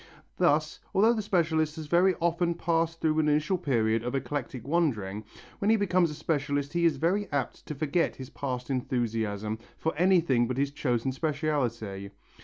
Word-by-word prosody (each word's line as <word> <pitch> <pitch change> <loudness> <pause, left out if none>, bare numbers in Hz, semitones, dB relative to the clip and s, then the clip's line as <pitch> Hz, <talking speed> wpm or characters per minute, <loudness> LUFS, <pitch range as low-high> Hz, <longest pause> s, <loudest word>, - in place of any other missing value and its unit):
Thus - - +2 0.2
although 220 +5 +5
the 220 - -1
specialist 160 -6 +1
has 160 -2 -6
very 175 +4 +3
often 170 0 0
passed 165 0 0
through 155 -1 +2
an 150 -1 +3
initial 155 +5 +1
period 115 -7 +1
of 125 +2 -3
eclectic 135 -3 -4
wandering, 110 - 0 0.3
when 200 - +1
he 225 - +6
becomes 185 -4 +2
a 150 - -6
specialist 145 -2 -1
he 170 0 +2
is 160 -4 +3
very 185 +7 0
apt 140 -3 -3
to 150 - -4
forget 155 +4 0
his 130 +1 -9
past 125 -2 -4
enthusiasm 110 -5 -2 0.2
for 160 - -1
anything 165 -8 +3
but 125 +1 -3
his 140 0 0
chosen 130 -3 -1
speciality. 130 -9 -2
150 Hz, 170 wpm, -28 LUFS, 125-170 Hz, 0.3 s, he